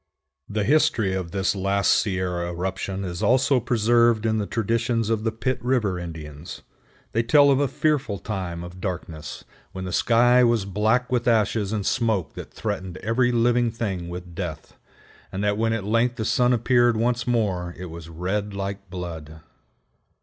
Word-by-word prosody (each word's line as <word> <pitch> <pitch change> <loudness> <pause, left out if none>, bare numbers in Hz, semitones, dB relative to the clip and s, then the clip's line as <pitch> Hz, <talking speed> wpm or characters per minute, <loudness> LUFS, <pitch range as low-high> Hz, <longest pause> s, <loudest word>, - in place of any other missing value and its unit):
The 105 0 -1
history 115 -6 +2
of 95 -2 -3
this 95 +2 0
last 100 +1 +2
Sierra 90 -3 -1
eruption 95 +2 -3
is 85 -1 -5
also 130 +1 +3
preserved 115 -1 +3
in 110 -1 +1
the 100 - -2
traditions 115 0 0
of 110 -1 0
the 115 - 0
Pitt 125 +2 -2
River 115 -8 +1
Indians. 80 -2 -8 0.5
They 115 - +1
tell 140 +4 +5
of 135 - +3
a 145 - +2
fearful 140 -7 0
time 90 -4 -5
of 90 +1 -10
darkness, 85 -5 -5 0.3
when 95 0 -5
the 90 - -4
sky 120 +5 +4
was 115 -4 +2
black 110 +6 +1
with 125 -1 0
ashes 110 -3 +2
and 105 -3 -2
smoke 110 -7 0
that - - -9
threatened 95 -5 -4
every 120 +4 +2
living 120 0 +2
thing 100 -7 -4
with 90 0 -8
death, 85 -3 -6 0.6
and 95 +2 -3
that 105 0 +2
when 115 +1 0
at 115 -3 -1
length 115 +4 +1
the 110 -3 -3
sun 125 +2 +3
appeared 120 -1 +3
once 120 +1 0
more 95 -7 0
it 90 -1 -7
was 85 0 -9
red 100 +5 -3
like 100 -1 -5
blood. 80 -4 -7
105 Hz, 170 wpm, -24 LUFS, 90-120 Hz, 0.6 s, tell